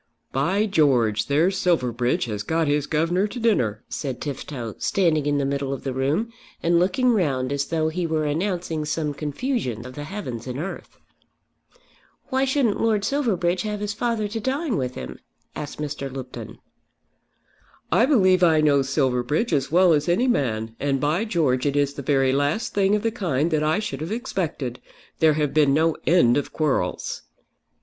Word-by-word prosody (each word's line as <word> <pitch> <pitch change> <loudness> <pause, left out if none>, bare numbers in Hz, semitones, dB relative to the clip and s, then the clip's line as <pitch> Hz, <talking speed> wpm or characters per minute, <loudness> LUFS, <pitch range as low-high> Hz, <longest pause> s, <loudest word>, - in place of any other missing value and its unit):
"By 185 +11 +1
George, 130 - +2
there's 170 +7 +2
Silverbridge 125 -8 +1
has 105 -3 -4
got 160 +8 0
his 145 0 +1
governor 170 +6 +1
to 245 +4 -7
dinner," 125 - +1
said 135 -4 -4
Tifto, 135 -5 -5
standing 160 -6 +1
in 145 0 +2
the 140 - 0
middle 140 0 -2
of 135 - -5
the 135 - -3
room, 150 - -1 0.3
and 170 0 +3
looking 195 +8 +2
round 140 - 0
as 140 0 -1
though 160 -1 0
he 170 +1 -2
were 155 -1 0
announcing 165 0 -1
some 150 -1 -2
confusion 145 - -3
of 130 - -8
the 145 +2 -6
heavens 130 - -6
and 125 0 -4
earth. 175 +7 -6 1.3
"Why 265 +1 +1
shouldn't 265 -5 +1
Lord 215 -3 +1
Silverbridge 195 -10 0
have 210 -1 -3
his 205 0 -3
father 230 -1 -1
to 225 +2 -3
dine 270 +3 -1
with 125 -4 -2
him?" - - -7 0.4
asked 145 - -6
Mr. 145 -2 -4
Lupton. 130 -1 -8 1.3
"I 240 - +4
believe 185 -10 +4
I 165 -3 +5
know 145 -2 +4
Silverbridge 135 - 0
as 140 -2 0
well 180 0 +5
as 150 +1 +1
any 205 +9 +2
man, 115 - -1
and 140 -1 0
by 155 +10 +1
George 150 - +1
it 140 - 0
is 145 -1 +1
the 140 - -6
very 135 -1 +2
last 145 - 0
thing 200 0 +3
of 210 - -2
the 225 - +1
kind 170 - -1
that 155 -1 +1
I 155 +1 +2
should 210 -7 -4
have 165 +5 -4
expected. 170 - -3 0.4
There 160 -1 +5
have 150 -2 -1
been 145 -3 +4
no 160 +1 +2
end 155 -8 +5
of 145 - -2
quarrels." 155 -3 -1
155 Hz, 175 wpm, -23 LUFS, 135-195 Hz, 1.3 s, I